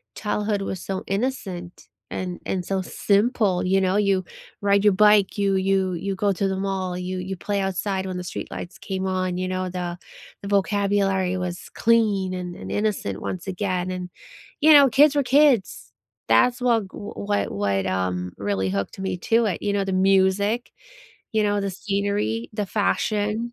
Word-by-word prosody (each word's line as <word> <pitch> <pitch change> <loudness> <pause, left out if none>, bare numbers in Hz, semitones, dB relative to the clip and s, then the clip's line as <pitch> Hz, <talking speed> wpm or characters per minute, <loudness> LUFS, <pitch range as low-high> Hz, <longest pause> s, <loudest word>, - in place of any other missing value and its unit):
childhood 210 -1 -1
was 190 -2 -4
so 190 -1 -4
innocent, 195 -5 -4 0.2
and 180 -1 -4
and 185 -2 -2
so 195 -1 -1
simple, 200 -1 +1
you 190 +1 +3
know, 185 0 +1
you 195 -2 +2 0.4
ride 200 0 +3
your 210 -1 +5
bike, 210 0 +4
you 200 -1 +2
you 190 -1 +1
you 195 +3 -3
go 200 +1 +1
to 195 +1 0
the 190 - -1
mall, 190 -2 -2
you 185 +1 -4
you 190 +1 -4
play 200 +2 -2
outside 190 0 -2
when 185 -1 -4
the 180 - -4
street 180 - -6
lights 175 - -7
came 190 0 -4
on, 185 -1 -1
you 185 0 -2
know, 185 0 -2
the 175 -1 -4 0.4
the 200 - -7
vocabulary 200 -2 +1
was 180 -1 -5
clean, 210 -5 +2
and 180 -1 -5
and - - -8
innocent 205 - -1
once 185 0 -5
again, 185 -1 -2
and, 180 -1 -5 0.5
you 315 - +7
know, 280 -2 +8
kids 290 +4 +5
were 285 - +3
kids. 260 - +2 0.4
That's 240 - +4
wha 235 -3 +3
g 195 - -9
what 205 0 -3
what, 100 -1 0
um, 90 -1 -1
really 100 -2 -1
hooked 100 - -3
me 190 -1 -2
to 225 +5 +2
it, 190 -5 -2
you 205 - 0
know, 200 -1 +1
the 195 - -2
music, 195 +4 +2 0.6
you 220 -1 +2
know, 205 0 +1
the 195 -1 -2
scenery, 195 - -2
the 210 -1 -2
fashion. 210 +2 0
195 Hz, 180 wpm, -23 LUFS, 185-205 Hz, 0.6 s, know